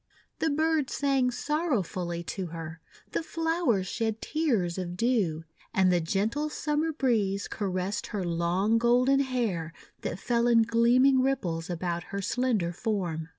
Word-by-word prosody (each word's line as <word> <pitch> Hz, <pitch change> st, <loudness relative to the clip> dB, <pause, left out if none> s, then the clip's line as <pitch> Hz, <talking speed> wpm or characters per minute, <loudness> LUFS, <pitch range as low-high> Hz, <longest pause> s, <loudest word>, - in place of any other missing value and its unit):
The 320 Hz, -, +1 dB
birds 315 Hz, -1 st, +1 dB
sang 275 Hz, -3 st, +2 dB
sorrowfully 215 Hz, -, -2 dB
to 185 Hz, +1 st, -4 dB
her; 165 Hz, 0 st, -7 dB, 0.3 s
the -, -, -1 dB
flow 325 Hz, -1 st, -1 dB
ers 195 Hz, -5 st, +2 dB
shed 220 Hz, +3 st, -2 dB
tears 225 Hz, -, 0 dB
of 175 Hz, -1 st, -5 dB
dew; 200 Hz, -10 st, +1 dB, 0.3 s
and 190 Hz, -1 st, +4 dB
the 175 Hz, -1 st, +2 dB
gentle 215 Hz, -, -1 dB
Summer 300 Hz, +2 st, -1 dB
breeze 220 Hz, -9 st, 0 dB
caressed 190 Hz, -1 st, -2 dB
her 205 Hz, -4 st, -3 dB
long 175 Hz, +6 st, +1 dB
golden 250 Hz, +3 st, +4 dB
hair 225 Hz, -, -1 dB, 0.3 s
that -, -, -3 dB
fell 235 Hz, +3 st, +1 dB
in 230 Hz, -1 st, +5 dB
gleaming 245 Hz, +4 st, +4 dB
ripples 180 Hz, -12 st, -1 dB
about 175 Hz, 0 st, -3 dB
her 200 Hz, +2 st, -5 dB
slender 210 Hz, -3 st, 0 dB
form. 175 Hz, -6 st, -2 dB
220 Hz, 145 wpm, -28 LUFS, 180-260 Hz, 0.3 s, in